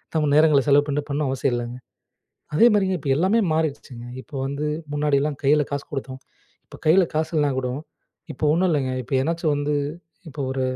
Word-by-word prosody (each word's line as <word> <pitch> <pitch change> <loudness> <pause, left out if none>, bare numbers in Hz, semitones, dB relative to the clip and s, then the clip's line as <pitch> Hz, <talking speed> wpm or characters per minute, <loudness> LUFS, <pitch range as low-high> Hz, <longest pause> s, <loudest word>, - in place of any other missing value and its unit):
நம்ப 155 -1 +2
நேரங்கள 150 -2 +5
செலவு 145 +1 +5
பண்ணீட்டு 145 +1 -2
பண்ணணும் 145 0 -1
அவசியம் 135 -1 0
இல்லங்க. 120 +1 -4 0.8
அதே 230 - +6
மாரிங்க, 190 -2 +2
இப்ப 140 - -3
எல்லாமே 190 +9 +3
மாறிடுச்சுங்க. 140 -6 -3 0.2
இப்ப - - -29
வந்து 140 +2 -3 0.3
முன்னாடிலாம் 145 -1 0
கையில 150 +2 +4
காசு 140 0 -2
குடுத்தோம். 130 -1 -5 0.5
இப்ப - - -12
கையில 180 +5 +6
காசு 155 0 0
இல்லன்னா 145 -2 +2
கூடோ 125 -1 -3 0.6
இப்ப - - -4
ஒண்ணும் 180 +3 +2
இல்லங்க, 135 -5 0
இப்ப 125 - -13
எதனாச்சும் 165 +2 0
வந்து 145 +1 -1 0.5
இப்ப 145 0 -13
ஒரு 130 0 -2
145 Hz, 175 wpm, -23 LUFS, 135-155 Hz, 0.8 s, அதே